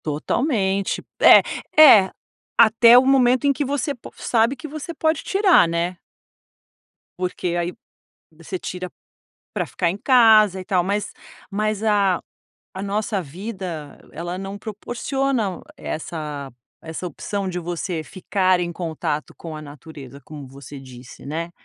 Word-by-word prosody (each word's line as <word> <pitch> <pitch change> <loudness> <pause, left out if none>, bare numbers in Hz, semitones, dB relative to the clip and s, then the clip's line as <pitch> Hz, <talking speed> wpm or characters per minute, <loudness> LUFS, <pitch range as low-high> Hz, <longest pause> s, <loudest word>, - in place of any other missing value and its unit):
Totalmente. 195 - -1 0.2
É - - +9 0.4
é, 210 -11 +8 0.5
até 230 +2 +7
o 255 - +5
momento 260 -1 +3
em 280 - +4
que 290 - -2
você 285 +1 -2
po 245 - -13
sabe 230 +3 +1
que 270 +4 -9
você 310 +3 -7
pode 315 0 0
tirar, 390 - +4
né. 170 +2 -2 1.2
Porque 180 -1 -3
aí 175 +1 -2 0.6
você 165 +4 -7
tira 180 0 -6 0.6
pra - - -1
ficar 175 - -1
em 185 - -3
casa 220 -6 +5
e 185 - -8
tal. 185 -3 +1
Mas 200 +3 -2 0.4
mas 215 +1 -1
a 200 -4 +2 0.6
nossa 205 0 -2
vida 175 -2 -7 0.2
ela 175 +3 -5
não 195 +1 -6
proporciona 235 0 -3 0.2
essa 150 -4 -6 0.3
essa 160 +2 -6
opção 195 +4 -4
de 180 -1 -3
você 175 -1 -4
ficar 185 +1 0
em 175 -1 -2
contato 160 -3 -4
com 165 -2 -8
a 155 - -8
natureza, 145 -2 -11
como 145 -3 -10
você 140 +1 -11
disse, 125 -2 -13
né. 165 +3 -4
185 Hz, 135 wpm, -22 LUFS, 165-225 Hz, 1.2 s, É